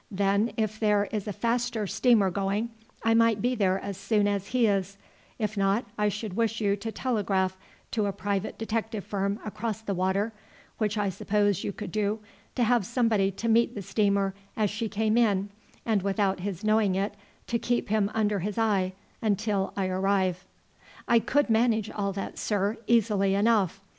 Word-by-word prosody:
Then 200 +2 +1
if 215 -1 -1
there 210 -2 +3
is 215 -1 -3
a - - -1
faster 235 +1 -1
steamer 215 0 +3
going, 200 +4 -1 0.3
I 225 - +3
might 230 -2 +4
be 245 +5 +1
there 195 -5 +2
as 200 -2 -5
soon 205 +1 +1
as 200 -1 -1
he 250 -2 +2
is; 195 -2 0 0.4
if 215 -2 -2
not, 200 +3 +1
I 210 0 +1
should 210 -2 -5
wish 225 0 0
you 200 -2 +2
to 220 +3 -5
telegraph 195 -7 0 0.4
to 215 -3 0
a - - 0
private 200 +1 -3
detective 225 -2 -2
firm 200 +1 -2
across 215 0 -4
the 205 -2 -3
water, 190 +4 0 0.5
which 215 -1 0
I 205 -1 +1
suppose 205 +1 0
you - - -2
could 200 -2 -7
do, 210 +1 0 0.4
to 245 - +2
have 240 -1 +3
somebody 215 -2 +2
to 200 +4 -4
meet 230 +1 +3
the 200 - -5
steamer 200 0 +1 0.2
as 210 -3 +1
she 215 +1 -3
came 220 +2 +1
in, 205 -4 +2 0.4
and 220 -4 +2
without 195 0 0
his 190 0 -4
knowing 215 -3 +3
it 195 +2 -1 0.3
to 235 - -1
keep 240 -2 -1
him 210 -1 +2
under 210 -2 +1
his 200 +3 -3
eye 200 -5 +1 0.3
until 205 -2 0
I 195 - +1
arrive." 185 -1 0 0.6
"I 235 -1 +5
could 290 +5 +1
manage 225 -2 +2
all 200 -1 -2
that, 195 - -5
sir, 205 0 0
easily 210 -4 +3
enough. 200 -3 +2
205 Hz, 180 wpm, -27 LUFS, 195-225 Hz, 0.6 s, I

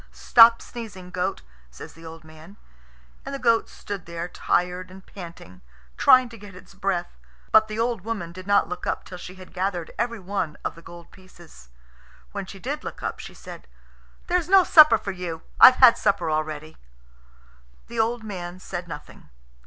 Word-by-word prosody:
"Stop 230 0 +6
sneezing, 205 -6 -9
goat," 180 - -3 0.3
says 60 - -11
the 165 0 -13
old 160 0 -11
man; 160 +5 -15 0.7
and 275 +1 -6
the - - -3
goat 230 -3 +2
stood 200 -4 -8
there 170 0 -5
tired 180 +1 -1
and 190 +1 -14
panting, 170 - -12 0.3
trying 255 - +6
to 230 -2 -13
get 200 -2 -12
its 180 - -15
breath. 190 - -3 0.3
But 220 0 +6
the 215 0 -6
old 230 -2 -1
woman 200 -5 -5
did 185 +2 -11
not 200 0 +3
look 180 - -6
up - - -2
till 180 - -10
she 185 +1 -10
had 185 -1 -14
gathered 180 -3 -3
everyone 200 -8 -3
of - - -2
the 165 - -15
gold 170 0 -13
pieces. 175 - -17 0.6
When 200 -2 -6
she 195 - -10
did 280 +9 -5
look - - -8
up, - - -4
she - - -10
said, - - -12 0.6
"There's 355 -1 0
no 385 -1 +7
supper 305 -9 +7
for 205 -2 -5
you. 175 -3 -6 0.2
I've 255 - +10
had 255 -3 +7
supper 200 -6 0
already." 155 0 -4 1.1
The 235 -1 -7
old 230 +1 0
man 180 -4 -7
said 180 -1 -7
nothing. 150 - -11
185 Hz, 175 wpm, -24 LUFS, 170-225 Hz, 1.1 s, I've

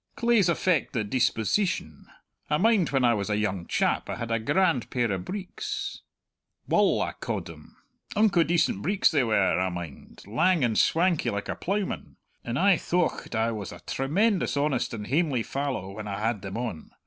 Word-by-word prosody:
Claes 235 -6 +3
affect 170 -2 +1
the 115 - 0
disposeetion. 120 - 0 0.4
I 150 - +2
mind 210 -2 +3
when 135 -3 +2
I 120 - +4
was 100 -2 -2
a 105 - +1
young 95 -5 -2
chap - - 0
I - - -2
had 115 -1 -5
a 115 - +1
grand 150 - +1
pair 120 -4 0
o' 95 - -1
breeks 400 - -5 0.7
Wull - - +3
I - - -3
ca'ed - - -3
them - - -13 0.4
unco 205 -4 +4
decent 165 - +1
breeks 200 - +2
they 145 -5 +3
were, 105 -6 +2
I 95 0 +1
mind, 85 -5 -8
lang 155 - +2
and 115 -3 +1
swankie 170 +4 +2
like 100 0 -4
a - - -2
ploughman; 200 +1 -3 0.3
and 120 +1 -3
I 200 +5 +4
aye 180 - +4
thocht 175 -8 -1
I 110 +1 +1
was 105 -5 -5
a - - -10
tremendous 180 +6 0
honest 140 -3 0
and 105 -2 -6
hamely 140 -3 +1
fallow 135 -9 -3
when 105 +1 -7
I 100 -1 -4
had 110 -1 -1
them 95 +2 -6
on! 115 -10 -5
130 Hz, 185 wpm, -27 LUFS, -, 0.7 s, I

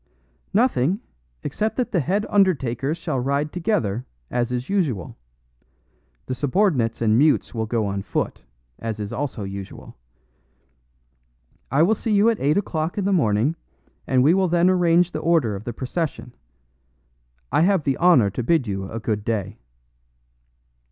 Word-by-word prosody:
"Nothing, 195 - +2 0.4
except 215 +1 -2
that 250 - -1
the 180 - +2
head 195 +8 0
undertakers 150 - +1
shall 135 - -2
ride 140 +4 -1
together, 125 - -1 0.2
as 120 0 -1
is 125 +1 -3
usual. 140 - -1 1.1
The 130 - -3
subordinates 130 - +1
and 110 +1 +3
mutes 150 +1 +2
will 110 -2 -2
go 110 -1 0
on 100 0 -2
foot, 100 - -3 0.4
as 110 -2 -4
is 105 -1 -5
also 135 -7 -3
usual. 95 0 -8 1.7
I 140 +5 +3
will 200 +6 +4
see 225 +1 -3
you 210 +3 +5
at 225 - -3
eight 145 +6 +2
o'clock 165 -4 -2
in 200 - -1
the 200 - +2
morning, 125 - +2 0.5
and 130 -1 +3
we 155 +5 +5
will 190 0 +2
then 175 +2 +3
arrange 175 -1 +3
the - - -3
order 155 -11 +2
of 100 +3 -8
the 120 - -3
procession. 130 +1 -4 1.2
I - - +3
have 185 -1 +3
the 135 -2 0
honor 160 - +5
to 100 - -3
bid 150 +2 +2
you 95 -2 -4
a 115 - -4
good 105 -2 -2
day." 105 -4 -3
140 Hz, 155 wpm, -23 LUFS, 115-180 Hz, 1.7 s, you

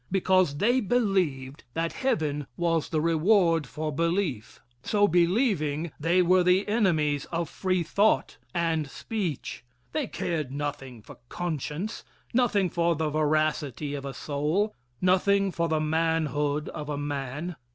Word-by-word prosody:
Because 185 -5 +2
they 240 - +3
believed 185 - 0
that 165 0 -1
heaven 150 - -1
was 165 -2 0
the 155 - 0
reward 165 - +3
for 155 +2 -4
belief. 165 - -1 0.2
So 205 - +2
believing, 170 - +1
they 170 +4 +3
were 185 +1 +4
the 180 +2 +3
enemies 160 -10 +1
of 165 -1 -3
free 185 +2 -1
thought 205 +6 +1
and 165 -4 0
speech 180 - -4 0.3
they 300 -5 -1
cared 155 -10 -3
nothing 140 -5 -5
for - - -13
conscience, 170 - -4 0.3
nothing 230 -6 +3
for 170 -1 +1
the 155 0 -1
veracity 150 -2 0
of 140 -1 -4
a 135 - -5
soul, 155 +9 -1 0.3
nothing 195 +2 +3
for 170 -1 -1
the 160 -1 +1
manhood 155 -2 0
of 150 -2 -6
a 145 - -2
man. 145 +3 -4
165 Hz, 135 wpm, -27 LUFS, 150-185 Hz, 0.3 s, were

